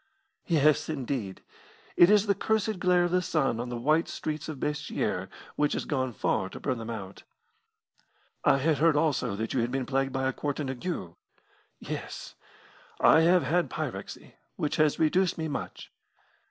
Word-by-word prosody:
"Yes, 155 -3 +3
indeed. 130 -9 -4 0.5
It 175 - +7
is 210 0 +5
the 200 - +3
cursed 215 0 0
glare 180 -1 +3
of 175 - 0
the 180 0 +3
sun 135 -9 0
on 120 +1 -4
the 120 - -4
white 155 +7 +2
streets 155 0 -4
of 155 - -5
Basseterre 150 +1 -2 0.3
which 150 0 +1
has - - -2
gone 130 -3 -1
far 95 -3 -1
to - - -9
burn 130 -4 -2
them 115 0 -6
out." 100 -4 -7 1.2
"I - - +5
had 150 +2 +1
heard 165 -1 +4
also 150 -9 +1
that 110 +2 -3
you 130 - +1
had 120 0 0
been 130 0 -2
plagued 135 +1 0
by 130 0 -1
a 130 - -1
quartan 145 -1 -3
ague." 130 - -5 0.7
"Yes; - - -6 0.7
I - - +6
have 175 +1 +4
had 170 +6 +1
a - - -11
pyrexy, - - -6 0.2
which 155 -5 -2
has 155 -1 +3
reduced 180 +4 +2
me 160 -1 -2
much." 145 - -6
150 Hz, 175 wpm, -28 LUFS, 130-165 Hz, 1.2 s, It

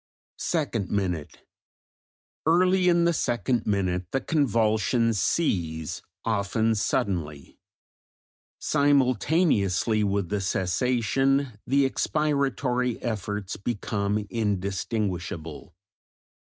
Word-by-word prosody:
Second 130 - -1
minute. 90 -7 -3 1.0
Early 180 +2 +4
in 170 -1 +3
the 170 - +3
second 120 - 0
minute 95 -3 0
the 135 - 0
convulsions 115 -5 +1
cease, 80 - -1 0.2
often 110 +1 +1
suddenly; 90 - -2 1.0
simultaneously 130 - +2
with 100 -3 0
the 105 -1 -1
cessation 125 +6 0
the 140 +1 +3
expiratory 135 -5 0
efforts 105 -3 -3
become 105 -1 -2
indistinguishable. 95 -6 -3
110 Hz, 75 wpm, -26 LUFS, 100-135 Hz, 1.0 s, Early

